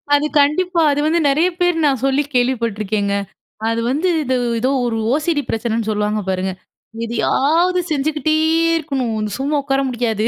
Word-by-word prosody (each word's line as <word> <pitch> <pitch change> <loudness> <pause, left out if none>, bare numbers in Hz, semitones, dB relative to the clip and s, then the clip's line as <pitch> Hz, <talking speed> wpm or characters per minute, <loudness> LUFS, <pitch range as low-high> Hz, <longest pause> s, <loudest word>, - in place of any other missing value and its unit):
அது 290 +1 +1
கண்டிப்பா 335 +5 +2
அது 285 - 0
வந்து 325 +2 +2
நெறய 315 +6 +3
பேர் 355 -2 +1
நான் 270 -4 +1
சொல்லி 270 +2 +2
கேள்விப்பட்டுருக்கேங்க. 220 -5 0 0.6
அது 230 0 -1
வந்து 300 +8 0 0.2
இது 260 -2 0 0.2
ஏதோ 255 +3 +1 0.2
ஒரு 230 -2 -1 0.2
ஓசிடி 305 +1 0
பிரச்சனன்னு 225 -1 -1
சொல்லுவாங்க 210 0 -1
பாருங்க, 190 0 -1 0.5
எதயாவது 320 +10 +1
செஞ்சுகிட்டே 310 +1 0 0.4
இருக்கணும், 275 -7 -2
இந்த 210 -1 -3
சும்மா 285 +3 -1
உட்கார 270 0 0
முடியாது. 230 -3 -1
270 Hz, 145 wpm, -18 LUFS, 225-305 Hz, 0.6 s, நெறய